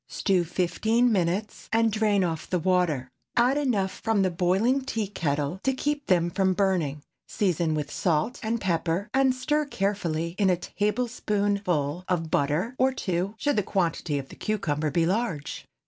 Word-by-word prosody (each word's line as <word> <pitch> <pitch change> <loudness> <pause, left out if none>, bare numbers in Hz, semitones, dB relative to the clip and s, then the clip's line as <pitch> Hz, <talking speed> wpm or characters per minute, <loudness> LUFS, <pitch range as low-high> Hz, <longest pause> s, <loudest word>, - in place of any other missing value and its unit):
Stew 185 -3 +1
fifteen 220 +8 +1
minutes, 190 +2 -1
and 225 0 +3
drain 210 -2 +2
off 165 -2 -3
the 180 - +1
water. 175 -7 +1 0.3
Add 245 +3 +4
enough 205 -10 0
from 225 -3 +2
the 185 - +1
boiling 195 +10 +2
tea 225 -5 -2
kettle 150 -3 -2
to 265 - +1
keep 295 +2 -2
them 175 -2 +2
from 190 0 +1
burning; 175 -8 0 0.2
season 170 -5 0
with 150 -1 -3
salt 165 +7 0
and 230 +1 -1
pepper, 170 0 -1
and 265 -1 +3
stir 295 +4 0
carefully 180 - -2
in 200 -2 +4
a 180 - +3
tablespoonful 200 - -1
of 165 -3 -1
butter—or 225 - +1
two, 185 -3 -2
should 290 +2 0
the - - +4
quantity 170 -6 -1
of 135 -1 -5
cucumber 160 -8 -2
be 165 +3 +1
large. 180 -6 -2
190 Hz, 155 wpm, -26 LUFS, 170-220 Hz, 0.3 s, Add